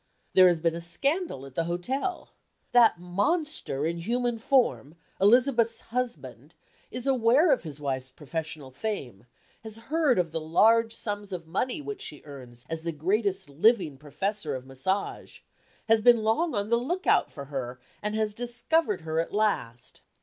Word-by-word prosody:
There 185 -1 +8
has 175 -2 +2
been 165 0 +1
a 170 - -5
scandal 275 - -1
at 135 - -12
the 165 +4 -1
hotel. 255 - -3 0.4
That 235 -7 +5
monster 200 - -1
in 170 +1 -2
human 240 +5 -1
form, 230 - +1 0.3
Elizabeth's 230 +2 +4
husband, 245 +1 -5 0.3
is 250 0 -6
aware 265 +5 +4
of - - +3
his 150 -3 -8
wife's 130 -3 -3
professional 150 0 -6
fame, 130 - -5 0.4
has 220 -1 -8 0.2
heard 315 -6 +3
of 175 -3 0
the 165 0 -3
large 225 +8 +3
sums 205 -1 -5
of 175 -3 -5
money 245 - -2
which 410 +5 -6
she 435 - -7
earns 125 -4 -12
as 165 0 -4
the 170 +1 -3
greatest 190 +6 -1
living 160 - +2
professor 155 +3 -3
of 130 0 -7
massage, 160 +10 -3 0.5
has 225 -1 +4
been 235 -1 +5
long 235 +8 +1
on 205 +2 -2
the 235 - +5
lookout 345 +11 +1
for 140 - -8
her, 130 -3 -5 0.2
and 210 +1 -2
has 215 -1 0
discovered 240 - 0
her 160 0 -2
at 165 - -2
last. 200 - -2
200 Hz, 160 wpm, -27 LUFS, 155-240 Hz, 0.5 s, There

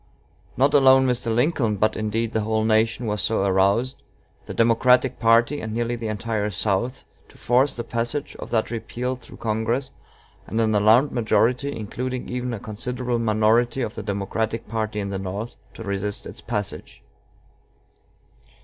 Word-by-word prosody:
Not 135 +3 +3
alone 130 -1 +6
Mr. 125 -2 0
Lincoln, 120 -2 +1
but, 110 +2 +1
indeed, 110 +1 -2
the 110 - +1
whole 110 +1 0
nation, 110 +2 +2
was 105 -1 -1
so 110 -3 +1
aroused 100 +6 +2 0.5
the - - -5
Democratic 125 +2 +3
party, 115 +5 +3
and 110 0 -5
nearly 120 +1 -1
the 115 -1 -5
entire 110 0 -2
South, 105 +6 -1 0.3
to - - -18
force 130 +4 +2
the 120 - -4
passage 120 +5 -3
of - - -8
that 110 -1 0
repeal 120 +2 -3
through 125 - -14
Congress, 115 +4 -1 0.6
and 110 - -2
an 110 -1 +2
alarmed 110 +7 +4
majority, 125 +3 +1
including 125 +3 -4
even 125 0 -3
a 115 - -4
considerable 120 +3 -3
minority 115 +3 +2
of 110 - -3
the - - -6
Democratic 105 +3 -3
party 110 -1 -2
in 100 -1 -3
the 95 - -3
North, 100 +5 -5 0.2
to 115 - -8
resist 100 0 -3
its - - -8
passage. 105 -4 -5
115 Hz, 160 wpm, -23 LUFS, 110-125 Hz, 0.6 s, alone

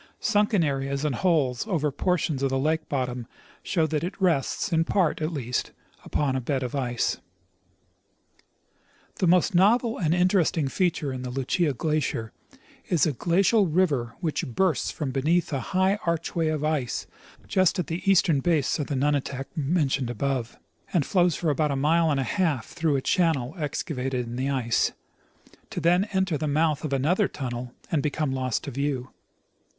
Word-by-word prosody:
Sunken 205 -4 +2
areas 140 0 -1
and 150 - 0
holes 145 - +1
over 155 -7 0
portions 160 -1 0
of 135 - +1
the 135 - 0
lake 155 +3 0
bottom 125 -3 -2 0.3
show 165 -4 +1
that 155 0 -1
it 180 - -5
rests, 175 +1 +1
in 165 0 +3
j)art 170 -2 +1
at 155 +2 -1
least, 125 -6 -3 0.3
upon 140 -3 -1
a 130 - -1
bed 130 +1 -1
of 125 - -4
ice. 125 -4 -1 2.0
The 185 - +2
most 180 +3 +4
novel 225 +6 +3
and 165 -2 +2
interesting 180 -4 +2
feature 160 -5 0
in 130 - -5
the 125 - -5
Lucia 135 +5 0
glacier 140 -5 -2 0.6
is 165 -6 +3
a 155 - 0
glacial 195 - +3
river 150 -9 +1
which 160 -4 -1
bursts 160 +5 +1
from 145 -4 -3
beneath 155 +5 +1
a 135 - 0
high 190 - +1
archway 170 -2 -1
of 155 -1 -1
ice 150 -6 -1 0.4
just 185 0 +2
at 180 - -1
the 165 +4 -4
eastern 170 -6 +4
base 160 -1 +1
of 145 - -2
the 145 - -2
nunatak 140 -1 -1
mentioned 140 -4 0
above, 125 -1 -2 0.3
and 165 -7 +2
flows 175 -4 +2
for 165 -3 0
about 150 +1 +1
a 140 - 0
mile 160 +4 +3
and 145 -2 +1
a - - +1
half 145 - 0
through 160 -4 0
a 135 - 0
channel 160 -8 +1
excavated 135 -5 -3
in 120 +1 -6
the 130 +2 -1
ice, 125 -4 +1 0.8
to - - -4
then 175 +3 +3
enter 190 -6 -1
the 155 - -1
mouth 150 0 +1
of 155 - -3
another 160 +10 +2
tunnel 125 -2 -6 0.2
and 160 -4 +2
become 150 0 -1
lost 130 -3 -1
to 140 - -5
view. 135 -1 -2
150 Hz, 170 wpm, -26 LUFS, 135-175 Hz, 2.0 s, most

